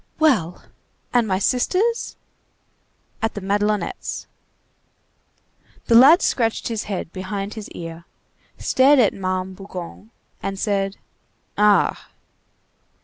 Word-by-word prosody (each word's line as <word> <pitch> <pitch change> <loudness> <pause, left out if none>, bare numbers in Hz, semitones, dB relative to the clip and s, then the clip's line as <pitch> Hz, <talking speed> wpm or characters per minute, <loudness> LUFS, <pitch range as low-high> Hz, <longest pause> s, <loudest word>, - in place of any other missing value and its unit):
"Well! 215 - +1 0.5
And 240 -2 +3
my 190 -2 +1
sisters?" 370 - 0 1.1
"At 225 0 -1
the - - -3
Madelonettes." 205 +2 -2 1.6
The - - +1
lad 275 +10 +8
scratched 230 -2 0
his 225 -1 -3
head 190 -4 -5
behind 195 +2 -4
his 215 -2 -8
ear, 165 0 -8 0.5
stared 275 +3 +4
at 230 -6 +4
Ma'am 185 -1 -3
Bougon, 190 +1 -9 0.3
and 195 0 -4
said:— 195 -1 -1 0.6
"Ah!" 210 -1 +2
205 Hz, 100 wpm, -22 LUFS, 190-235 Hz, 1.6 s, lad